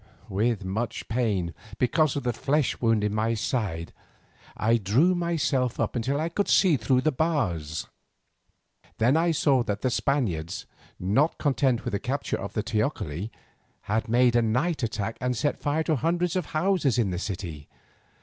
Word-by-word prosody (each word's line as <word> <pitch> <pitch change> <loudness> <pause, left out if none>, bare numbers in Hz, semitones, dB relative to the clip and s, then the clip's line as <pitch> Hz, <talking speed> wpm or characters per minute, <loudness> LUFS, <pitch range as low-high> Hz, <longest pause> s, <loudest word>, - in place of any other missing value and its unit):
With 105 0 0
much 110 +5 -3
pain, 105 -8 0 0.2
because 140 +4 +2
of 140 - -2
the 120 -1 0
flesh 140 +5 0
wound 115 -3 +2
in 105 0 0
my 110 +2 +1
side, 100 -8 -2 0.6
I 115 +2 +3
drew 120 - +3
myself 155 -8 0
up - - 0
till 140 +5 -1
I 160 - 0
could 195 +4 -1
look 165 - +4
through 125 +3 +3
the 155 - +2
bars. 105 - -1 1.1
Then 120 +6 +3
I 165 +2 +3
saw 140 -4 +3
that 105 -3 -2
the 130 - +1
Spaniards, 95 - -1 0.3
not 110 - +2
content 135 -4 +1
with - - -2
the 100 - -1
capture 135 +6 -2
of 100 - -6
the 105 - -1
teocalli, 105 - -2 0.5
had 110 +2 -2
made 120 +1 +4
a 120 - +5
night 130 +9 0
attack 110 -2 -3
and 125 -1 0
set 145 +3 0
fire 150 +2 0
to 155 -2 +1
hundreds 170 +4 0
of 180 -4 -1
houses 155 - +1
in 110 -6 +1
the 90 - -2
city. 90 -7 -5
120 Hz, 170 wpm, -26 LUFS, 105-145 Hz, 1.1 s, a